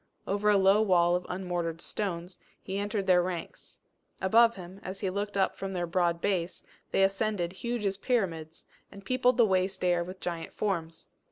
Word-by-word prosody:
Over 205 +2 +1
a 205 - +5
low 195 +2 +5
wall 175 -4 +4
of 180 - -3
unmortared 175 -3 -3
stones, 180 -2 -4 0.2
he 195 +1 -4
entered 205 -1 -2
their 180 -2 +5
ranks: 175 -2 -6 0.4
above 230 +4 +5
him, 185 +1 -10
as 190 +1 -6
he 190 - -1
looked 205 +1 -3
up 195 - +2
from 195 0 -5
their 175 -1 -1
broad 170 -1 +1
base, 185 -3 -1 0.3
they 195 - +2
ascended 195 -2 0
huge 235 +2 -3
as 195 -1 0
pyramids, 170 -9 -2 0.3
and 200 0 -12
peopled 255 0 +2
the 235 - +6
waste 190 -1 0
air 175 -1 +2
with 185 +2 -9
giant 170 -2 -5
forms. 165 -6 -3
190 Hz, 180 wpm, -29 LUFS, 175-205 Hz, 0.4 s, the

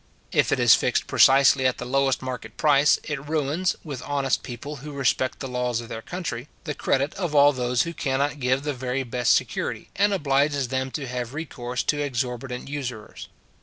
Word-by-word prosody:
If - - +2
it - - +2
is - - +7
fixed - - +1
precisely 135 0 +5
at 130 - -1
the 125 - -6
lowest 135 +1 +1
market 125 -3 -6
price, 150 -1 +4
it 150 -3 -4
ruins, 160 +4 0
with 140 -6 -6
honest 140 -1 0
people 135 +4 -7
who 145 +3 -9
respect 130 -1 0
the 135 - -4
laws 125 -2 -1
of 115 - -8
their 115 - -5
country, 145 -6 -5 0.2
the 155 -4 -3
credit 140 +1 0
of 175 -6 -2
all 145 0 +6
those 125 -2 +1
who 170 - -5
cannot 140 +1 -1
give 130 +1 +1
the 150 0 -1
very 130 +1 -2
best 125 -1 +2
security, - - -3
and 205 +1 +3
obliges 140 -5 +1
them 130 0 -1
to 140 +1 -5
have 125 0 -5
recourse 125 -5 -4
to 145 -1 0
exorbitant 125 -2 -3
usurers. 130 -6 -6
135 Hz, 190 wpm, -24 LUFS, 125-145 Hz, 0.2 s, is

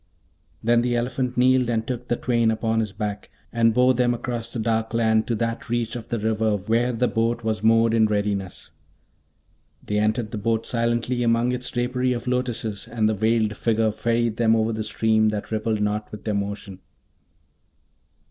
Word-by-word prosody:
Then 120 +1 +3
the 120 0 0
elephant 125 +1 -2
kneeled 125 0 +3
and 115 -1 0
took 125 0 -5
the 120 - +1
twain 115 -2 +1
upon 110 0 0
his 110 -3 -1
back, 105 0 -5 0.2
and 115 -1 +3
bore 125 +3 +4
them 120 -1 +1
across 120 -1 -4
the - - -4
dark 110 0 -1
land 110 -1 +2
to 120 - 0
that 115 +1 -3
reach 120 -1 -1
of 120 - -7
the 120 - -2
river 110 -1 0
where 115 +5 0
the 125 +1 +1
boat 115 +1 -1
was 110 -2 -1
moored 115 +1 +4
in 110 -1 +4
readiness. 100 -3 -3 1.1
They 105 0 0
entered 110 +1 0
the 110 - -4
boat 115 +1 0
silently 120 +1 0
among 115 +1 +2
its 125 0 -3
drapery 125 +1 0
of 120 - -5
lotuses, 120 -4 -2
and 110 -2 0
the 110 - +1
Veiled 110 0 +1
Figure 110 -1 +1
ferried 115 +1 0
them 115 -1 +3
over 110 0 +1
the 110 0 -3
stream 110 0 +2
that 105 0 -3
rippled 110 -1 -1
not 105 +1 -2
with 105 - -9
their 105 - -1
motion. 100 -1 -4
115 Hz, 185 wpm, -23 LUFS, 110-120 Hz, 1.1 s, bore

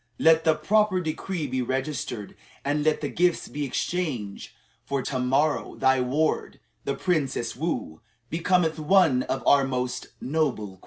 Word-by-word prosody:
Let 160 0 +4
the 160 -1 +5
proper 210 +1 +2
decree 165 0 -3
be 130 -1 -1
registered, 130 -4 -3 0.3
and 145 +1 +1
let 155 0 +2
the 145 - -1
gifts 175 +3 +1
be 145 0 -3
exchanged; 135 - -3 0.3
for 140 -2 -2
to 130 - -2
morrow 135 +4 +1
thy 130 -1 +3
ward, 145 +5 0 0.3
the - - -1
Princess 135 -9 -1
Woo, 125 - -3 0.3
becometh 165 +1 +1
one 155 -5 +4
of 130 +1 -3
our 140 -1 +6
most 125 -1 -2
noble 140 -7 -1
queens." - - -30
145 Hz, 150 wpm, -26 LUFS, 130-160 Hz, 0.3 s, our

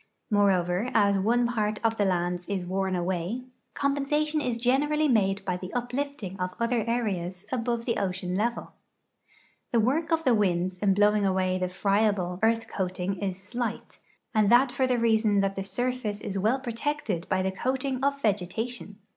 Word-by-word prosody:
^Moreover, 190 +1 +2
as 200 -1 +4
one 240 +5 +2
part 215 -3 -1
of 225 0 +1
the 205 - +2
lands 175 -1 -1
is 195 -3 -2
worn 190 +1 -1
away, 180 +6 -2 0.3
compensation 295 +2 0
is 245 -4 -1
generally 290 +6 +2
made 200 -6 +2
by 180 -1 -1
the 185 0 -7
uplifting 245 -5 -3
of 185 0 -3
other 235 -1 +1
areas 190 -6 -2
above 235 -2 -1
the 235 -2 0
ocean 185 -2 -2
level. 235 +4 -1 1.0
The 235 - +3
work 300 +9 +1
of 325 0 +2
the 255 -5 +4
winds 185 -3 +1
in 195 -1 +2
blowing 210 0 +4
away 185 -1 +1
the 185 - 0
friable 195 -1 +1
earth 225 +1 +2
coating 185 0 -3
is 190 -2 -3
slight, 235 +3 -5 0.3
and 215 -3 +3
that 250 +2 +5
for 260 0 +1
the 250 -1 +1
reason 220 -3 +3
that 195 0 0
the 195 - -3
surfiice 245 0 -2
is 200 -1 -3
well 220 +7 +2
])rotected 240 - -3
by 185 0 +1
the 190 - 0
coating 260 +5 -2
of 280 0 +1
vegetation. 210 +2 -2
210 Hz, 170 wpm, -27 LUFS, 190-245 Hz, 1.0 s, that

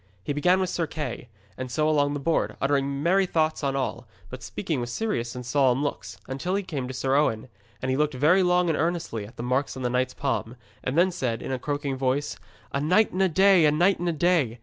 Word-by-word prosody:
He 145 - -2
began 180 +6 +3
with 185 -1 -1
Sir 165 -2 -1
Kay, 135 -6 -5 0.3
and 130 0 -4
so 155 +5 0
along 145 -2 +2
the - - -3
board, 160 +4 0
uttering 140 0 0
merry 190 +3 +3
thoughts 155 -2 0
on 135 -1 0
all, 130 -2 -3 0.2
but 130 0 -7
speaking 155 - -3
with 120 - -4
serious 120 - -2
and 125 0 -6
solemn 130 0 +2
looks, 145 - -4
until 135 +8 -2
he 200 - -1
came 145 -9 -4
to 130 - -6
Sir 130 +1 0
Owen. 130 -5 +1 0.3
And 130 - 0
he 130 - 0
looked 150 -1 +1
long 180 +5 +3
and 165 - +1
earnestly 165 -12 -2
at 115 - -17
the - - -5
marks 130 +3 -1
in 130 - -5
that 125 - 0
knight's 125 +1 0
palm, 125 -3 -2 0.3
and 130 +5 -2
then 185 +2 +4
said, 125 -10 -3
in - - -4
a 130 - -2
croaking 145 -1 -3
voice: 135 +2 -1 0.4
'A 140 - -1
night 185 +9 +3
and 185 - -1
a 190 - +4
day, 190 +1 +5
a - - +4
night 175 +6 +3
and 175 0 -1
a - - +2
day! 160 -7 +1
145 Hz, 240 wpm, -26 LUFS, 130-170 Hz, 0.4 s, day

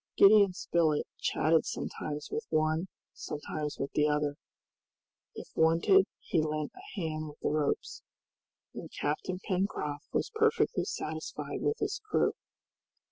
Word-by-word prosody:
Gideon 200 -1 +7
Spilett 165 -4 +1
chatted 160 0 +3
sometimes 150 0 -4
with 450 0 -3
one, 155 +3 +1 0.3
sometimes 150 0 -4
with 140 - -3
the 150 0 +3
other, 150 -1 +1 1.0
if - - -8
wanted 170 +5 +5
he 165 - 0
lent 155 -1 -2
a 375 - -9
hand 155 -2 -2
with 150 - -11
the - - +1
ropes, 150 -1 -1 0.7
and - - -7
Captain 155 +5 -1
Pencroft 180 -7 -1
was - - -1
perfectly 445 +1 +2
satisfied - - -4
with 440 - +1
his - - -2
crew. - - +3
160 Hz, 130 wpm, -31 LUFS, 150-195 Hz, 1.0 s, Gideon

